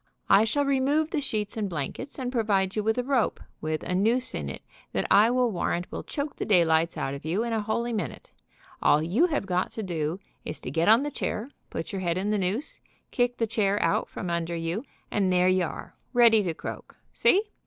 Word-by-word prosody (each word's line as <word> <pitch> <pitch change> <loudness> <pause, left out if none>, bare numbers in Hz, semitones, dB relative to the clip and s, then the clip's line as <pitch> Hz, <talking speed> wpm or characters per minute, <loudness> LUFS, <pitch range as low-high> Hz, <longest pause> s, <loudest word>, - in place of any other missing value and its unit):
I 200 +3 +7
shall 285 +6 +1
remove 280 +3 +2
the 300 - 0
sheets 215 -7 -2
and 210 -3 -2
blankets, 170 - -5
and 255 -2 -3
provide 200 -6 +1
you 215 - +1
with 220 +2 +1
a 250 - +1
rope, 255 -3 +1 0.2
with 155 0 -2
a - - -3
noose 225 +7 +2
in - - -3
it - - -8 0.3
that - - 0
I 215 +3 +7
will 250 -1 +2
warrant 175 -1 -2
will - - -4
choke 285 -1 -5
the - - -2
daylights 165 -4 +3
out 135 - -2
of 140 - -7
you 175 +8 0
in 235 -1 -2
a 220 - +1
holy 235 +3 -1
minute. 180 - -4 0.5
All 150 - +4
you 210 - +3
have 295 - -1
got 180 -1 0
to 220 - -4
do 165 -1 -2 0.2
is - - -5
to 125 - -5
get 165 +4 +1
on 230 +5 +6
the 295 - -3
chair, 250 -1 -3 0.2
put 165 - -5
your 195 - -3
head 175 -1 0
in 200 +3 -1
the 210 - +1
noose, 195 - -1 0.3
kick 245 0 +1
the 230 - +1
chair 205 -2 +1
out 165 - +1
from 180 - -5
under 170 0 -1
you, 165 +7 -2 0.3
and 195 -3 +1
there 180 0 +4
you 185 -1 +3
are, - - -8 0.2
ready 235 -3 +6
to 175 -5 -2
croak. - - -7 0.2
See? 395 +3 +4
205 Hz, 225 wpm, -27 LUFS, 175-245 Hz, 0.5 s, I